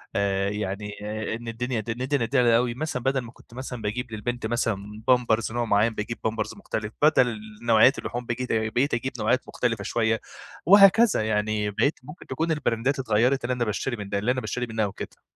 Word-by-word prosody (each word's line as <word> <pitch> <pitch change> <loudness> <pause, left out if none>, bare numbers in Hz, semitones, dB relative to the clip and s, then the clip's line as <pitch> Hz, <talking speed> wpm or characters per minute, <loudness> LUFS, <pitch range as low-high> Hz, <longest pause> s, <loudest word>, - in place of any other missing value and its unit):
آآ، 100 -1 +1
يعني، 105 0 -4
آآ، 110 +1 -3
إن 120 0 -9
الدنيا 120 +1 -2
د 110 - -7
ند 140 +3 0
نديها 120 -2 +3
أوي 120 -1 0
مثلًا 125 -3 -4
بدَل 135 0 +1
ما 115 -1 -10
كنت 120 - -20
مثلًا 125 -2 -6
باجيب 115 +3 -3
للبنت 120 +2 -4
مثلًا 110 -2 -2
بامبرز 115 -3 +2
نوع 120 0 -1
مُعيّن 110 +2 +2
باجيب 115 +3 -4
بامبرز 110 0 -2
مختلف، 110 - -5
بدل 125 -7 +4 0.3
نوعيّات 115 +4 +5
اللحوم 120 0 -5
بجيت 125 +1 -3
بقيت 115 +5 0
اجيب 130 +3 -1
نوعيّات 125 +4 +1
مختلفة 115 -5 -1
شويّة، 115 0 0 0.4
وهكذا 200 - +6
يعني 105 -1 0
بقيت 140 +9 0
ممكن 150 +6 -12
تكون 160 +5 -1
البراندات 135 -2 0
اتغيّرِت 125 +3 +2
اللي 125 - 0
أنا 120 -1 -1
باشتري 120 +4 -2
من 100 -2 -7
ده 100 - 0
اللي 115 +5 +1
أنا 130 0 -1
باشتري 120 +3 -3
منها 110 -1 0
وكده. 100 - -8
115 Hz, 190 wpm, -25 LUFS, 110-125 Hz, 0.4 s, وهكذا